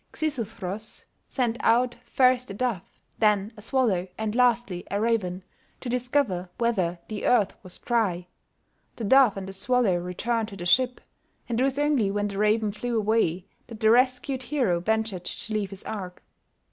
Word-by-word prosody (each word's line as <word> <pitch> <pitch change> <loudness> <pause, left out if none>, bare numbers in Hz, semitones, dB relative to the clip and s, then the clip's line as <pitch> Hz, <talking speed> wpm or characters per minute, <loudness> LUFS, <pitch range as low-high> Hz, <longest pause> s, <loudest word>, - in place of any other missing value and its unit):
Xisuthros 220 - -5 0.2
sent 240 -3 -1
out 240 +2 +3
first 255 -1 +2
a 195 - -6
dove, 235 -5 -1 0.4
then 210 0 +2
a 210 - -12
swallow, 220 -6 +1
and 220 -1 -2
lastly 240 -7 +2
a 200 - -1
raven, 200 -5 0 0.4
to 250 - -6
discover 245 -7 0
whether 190 -8 0
the 215 -2 -5
earth 220 -6 +3
was 185 -2 -10
dry; 205 -8 0 0.7
the 230 - -6
dove 250 -1 +5
and 190 -1 -5
the 195 - -7
swallow 215 -1 +2
returned 215 +6 -2
to 200 - -10
the 175 - -6
ship, 250 +7 +3 0.5
and 235 0 -1
it - - +4
was 270 0 0
only 290 -8 +2
when 205 +1 -1
the 200 0 -5
raven 215 0 +2
flew 235 +3 -3
away 205 -5 +1 0.2
that 225 -3 -10
the 220 -1 +4
rescued 255 +2 +2
hero 245 -9 0
ventured 220 -1 -1
to 220 - -4
leave 210 -2 -1
his 195 -1 -9
ark. 185 -4 -6
220 Hz, 170 wpm, -26 LUFS, 195-245 Hz, 0.7 s, dove